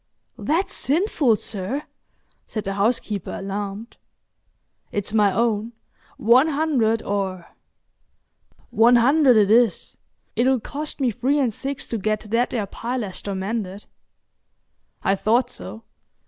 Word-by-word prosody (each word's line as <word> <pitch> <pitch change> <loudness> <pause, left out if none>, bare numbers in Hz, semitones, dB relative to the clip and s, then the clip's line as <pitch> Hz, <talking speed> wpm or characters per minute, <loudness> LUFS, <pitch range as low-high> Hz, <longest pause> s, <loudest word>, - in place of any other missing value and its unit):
"That's 335 +6 0
sinful, 290 - +2
sir," 210 +8 -4 0.6
said 215 - -4
the 195 - -3
housekeeper, 205 0 -1
alarmed. 200 +3 -5 0.9
"It's 205 0 -2
my 210 -2 +4
own. 225 +1 0 0.4
One 245 +7 +5
hundred 280 -8 +1
or——" 190 -3 -2 1.3
"One 230 +3 +5
hundred 260 +1 +5
it 205 -1 +4
is. 230 -3 +2 0.4
It'll 255 +1 +3
cost 300 +8 -5
me 255 -3 +2
three 255 +6 0
and 255 -6 +1
six 275 +4 -4
to 230 - -2
get 215 +1 -1
that 235 +2 +2
there 225 -5 -2
pilaster 205 -3 -4
mended." 195 0 -4 1.2
"I 195 - +3
thought 230 +5 +1
so. 225 - -9
225 Hz, 120 wpm, -23 LUFS, 205-255 Hz, 1.3 s, One